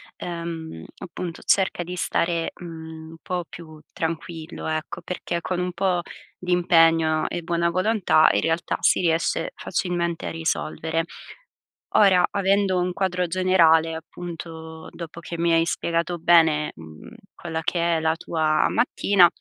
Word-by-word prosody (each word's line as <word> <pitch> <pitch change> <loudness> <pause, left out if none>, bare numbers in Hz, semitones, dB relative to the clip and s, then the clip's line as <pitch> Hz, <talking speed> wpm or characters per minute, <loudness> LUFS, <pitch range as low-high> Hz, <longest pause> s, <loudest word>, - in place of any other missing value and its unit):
ehm, 165 - -6
appunto 175 -1 -7
cerca 190 -2 +2
di 180 +1 -6
stare, 170 -1 -1
mhmm, 160 -2 -9
un 165 - -12
po' 180 -2 -3
più 155 -2 -11
tranquillo, 165 0 -5
ecco, 155 0 -3
perché 175 -1 -3
con 180 +1 -2
un 180 0 -1
po' 180 -1 0 0.3
di 180 0 -2
impegno 165 -3 +4
e 175 - -4
buona 170 0 +1
volontà, 185 -2 +3
in - - +1
realtà 165 +1 0
si - - +3
riesce 170 - 0
facilmente 170 - -2
a - - -3
risolvere. 165 0 -2 0.9
Ora, 190 -3 +6
avendo 195 -1 +2
un 180 0 -1
quadro 180 -1 0
generale, 165 -3 +3
appunto, 160 -1 -8
dopo 170 -1 -8
che 170 0 -7
mi 170 0 +2
hai 165 0 +4
spiegato 170 +1 -1
bene, 160 -3 +4
mhmm, 80 - -12 0.2
quella 165 -2 -5
che 170 0 +1
è - - 0
la 160 0 +1
tua 155 -2 +1
mattina, 200 -6 +4
170 Hz, 140 wpm, -24 LUFS, 160-180 Hz, 0.9 s, Ora